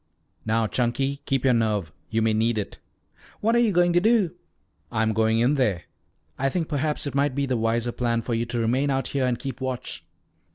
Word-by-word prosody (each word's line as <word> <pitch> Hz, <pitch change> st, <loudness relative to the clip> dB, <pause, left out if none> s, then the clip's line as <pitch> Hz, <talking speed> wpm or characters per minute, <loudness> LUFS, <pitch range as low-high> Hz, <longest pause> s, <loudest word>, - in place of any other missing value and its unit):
"Now, 110 Hz, +1 st, +2 dB
Chunky, 135 Hz, +5 st, -1 dB
keep 135 Hz, -2 st, 0 dB
your 130 Hz, -, +5 dB
nerve. 105 Hz, -8 st, 0 dB, 0.2 s
You 110 Hz, 0 st, +1 dB
may 110 Hz, -1 st, +2 dB
need 110 Hz, +1 st, +1 dB
it." 105 Hz, -, -4 dB, 0.6 s
"What 225 Hz, +2 st, +2 dB
are -, -, +5 dB
you 235 Hz, -3 st, +3 dB
going 175 Hz, -1 st, +3 dB
to 175 Hz, -, +4 dB
do?" 215 Hz, -4 st, +3 dB, 0.6 s
"I'm 110 Hz, -1 st, +1 dB
going 110 Hz, +1 st, +2 dB
in 120 Hz, +5 st, +3 dB
there. 105 Hz, -, +1 dB, 0.6 s
I 135 Hz, +1 st, +2 dB
think 165 Hz, +1 st, -2 dB
perhaps 150 Hz, 0 st, -1 dB
it 140 Hz, -, -3 dB
might 140 Hz, -1 st, +1 dB
be 140 Hz, 0 st, 0 dB
the 130 Hz, -2 st, -1 dB
wiser 115 Hz, +1 st, 0 dB
plan 115 Hz, -1 st, -1 dB
for 120 Hz, -, -2 dB
you 115 Hz, +1 st, -1 dB
to 120 Hz, -, -3 dB
remain 125 Hz, +5 st, +1 dB
out 135 Hz, -1 st, 0 dB
here 135 Hz, -2 st, 0 dB
and 125 Hz, -1 st, 0 dB
keep 135 Hz, 0 st, -6 dB
watch." 130 Hz, -2 st, -4 dB
125 Hz, 210 wpm, -25 LUFS, 115-140 Hz, 0.6 s, your